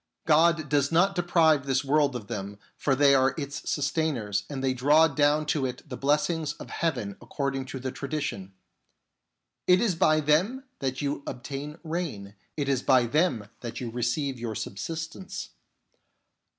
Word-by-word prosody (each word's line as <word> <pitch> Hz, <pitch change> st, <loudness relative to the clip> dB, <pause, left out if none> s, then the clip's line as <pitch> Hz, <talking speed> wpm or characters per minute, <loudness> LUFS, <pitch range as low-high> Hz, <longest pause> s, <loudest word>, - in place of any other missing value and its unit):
God 160 Hz, 0 st, +4 dB
does 145 Hz, 0 st, +1 dB
not 180 Hz, +4 st, +4 dB
deprive 160 Hz, -5 st, +3 dB
this 135 Hz, +1 st, +1 dB
world 145 Hz, -1 st, +2 dB
of 115 Hz, -4 st, -5 dB
them, 100 Hz, 0 st, -5 dB, 0.2 s
for 135 Hz, -, +1 dB
they 140 Hz, 0 st, +5 dB
are 135 Hz, 0 st, +3 dB
its 145 Hz, -2 st, -4 dB
sustainers, 135 Hz, -9 st, -1 dB
and 135 Hz, -2 st, -4 dB
they 130 Hz, -1 st, +2 dB
draw 145 Hz, +5 st, +5 dB
down 150 Hz, +1 st, +2 dB
to 150 Hz, -2 st, 0 dB
it 125 Hz, +4 st, -8 dB
the 130 Hz, -, -6 dB
blessings 150 Hz, +3 st, 0 dB
of -, -, -11 dB
heaven 125 Hz, -12 st, -2 dB
according 135 Hz, +2 st, -3 dB
to 130 Hz, 0 st, -6 dB
the 130 Hz, 0 st, -4 dB
tradition: 140 Hz, -11 st, -4 dB, 0.6 s
" -, -, -56 dB
It 180 Hz, 0 st, +6 dB
is 225 Hz, -6 st, +2 dB
by 155 Hz, -2 st, +3 dB
them 175 Hz, -, +2 dB, 0.2 s
that 130 Hz, +1 st, -2 dB
you 140 Hz, 0 st, -2 dB
obtain 140 Hz, +4 st, -6 dB
rain, 155 Hz, -, -4 dB, 0.2 s
it 145 Hz, -2 st, -1 dB
is 135 Hz, -2 st, +1 dB
by 130 Hz, -3 st, +4 dB
them 125 Hz, -, +1 dB
that 120 Hz, -2 st, -6 dB
you 120 Hz, -2 st, -4 dB
receive 125 Hz, +3 st, -1 dB
your 115 Hz, -2 st, -4 dB
subsistence." 165 Hz, -, -5 dB
140 Hz, 165 wpm, -27 LUFS, 130-155 Hz, 0.6 s, It